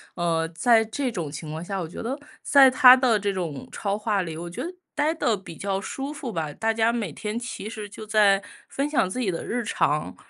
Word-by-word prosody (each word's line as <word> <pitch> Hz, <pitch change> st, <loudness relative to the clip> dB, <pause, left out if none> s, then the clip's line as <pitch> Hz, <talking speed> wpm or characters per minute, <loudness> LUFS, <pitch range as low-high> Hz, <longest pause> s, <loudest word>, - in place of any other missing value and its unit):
呃， 165 Hz, -2 st, 0 dB
在 225 Hz, +4 st, +4 dB
这 250 Hz, +4 st, -2 dB
种 170 Hz, -9 st, -4 dB
情 150 Hz, +2 st, -7 dB
况 160 Hz, +1 st, -5 dB
下， 195 Hz, +1 st, -3 dB
我 -, -, -3 dB
觉 160 Hz, -, -8 dB
得 255 Hz, +5 st, -3 dB, 0.2 s
在 270 Hz, -2 st, +6 dB
他 255 Hz, 0 st, +9 dB
的 250 Hz, -4 st, +2 dB
这 200 Hz, 0 st, -1 dB
种 165 Hz, -8 st, -4 dB
超 200 Hz, -1 st, -2 dB
话 210 Hz, -2 st, 0 dB
里， 165 Hz, -3 st, -5 dB
我 170 Hz, +1 st, -6 dB
觉 170 Hz, -, -5 dB
得 350 Hz, -, -5 dB, 0.2 s
待 305 Hz, +1 st, +1 dB
得 240 Hz, -9 st, +1 dB
比 185 Hz, -4 st, -11 dB
较 195 Hz, -1 st, -2 dB
舒 275 Hz, +8 st, -5 dB
服 275 Hz, -5 st, -6 dB
吧， 155 Hz, -6 st, -3 dB
大 225 Hz, +6 st, 0 dB
家 225 Hz, +1 st, +2 dB
每 220 Hz, -8 st, -2 dB
天 210 Hz, +8 st, -5 dB
其 235 Hz, -3 st, -5 dB
实 215 Hz, -2 st, -7 dB
就 215 Hz, +2 st, -9 dB
在 210 Hz, -2 st, +4 dB, 0.3 s
分 280 Hz, +2 st, -2 dB
享 265 Hz, -11 st, +1 dB
自 220 Hz, -, -4 dB
己 235 Hz, -6 st, 0 dB
的 170 Hz, -, -3 dB
日 240 Hz, 0 st, -2 dB
常。 150 Hz, -, 0 dB
210 Hz, 250 characters per minute, -25 LUFS, 175-240 Hz, 0.3 s, 他